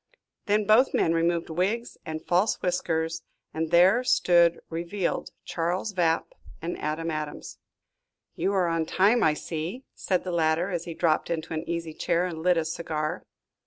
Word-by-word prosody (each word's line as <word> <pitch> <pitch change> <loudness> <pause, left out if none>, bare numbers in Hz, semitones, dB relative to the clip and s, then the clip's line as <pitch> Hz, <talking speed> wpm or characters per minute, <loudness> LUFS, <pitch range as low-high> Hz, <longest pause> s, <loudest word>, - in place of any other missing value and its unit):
Then 210 0 +2
both 220 +6 +4
men 165 - +2
removed 170 0 0
wigs 200 +8 -1
and 155 0 -5
false 185 +5 +2
whiskers, 165 -2 -1 0.3
and 160 0 -2
there 185 +8 +5
stood 170 -7 +4
revealed 170 +3 -3 0.2
Charles 175 +5 -2
Vapp 165 -3 +1 0.3
and 170 +2 -4
Adam 160 +2 -2
Adams. 155 -1 -6 0.7
"You 185 +4 -1
are 190 -2 +2
on 165 -1 0
time, 210 +5 +3
I 155 - +3
see," 170 +12 -5
said 185 -2 -1
the 185 - -4
latter, 165 +2 +1
as 170 -2 -3
he 170 -2 -6
dropped 160 -2 +1
into 165 -1 -3
an 160 +1 -4
easy 165 -2 -3
chair 170 +3 0
and 165 -3 -5
lit 180 +1 +3
a 165 - 0
cigar. 160 0 -3
170 Hz, 160 wpm, -26 LUFS, 160-185 Hz, 0.7 s, there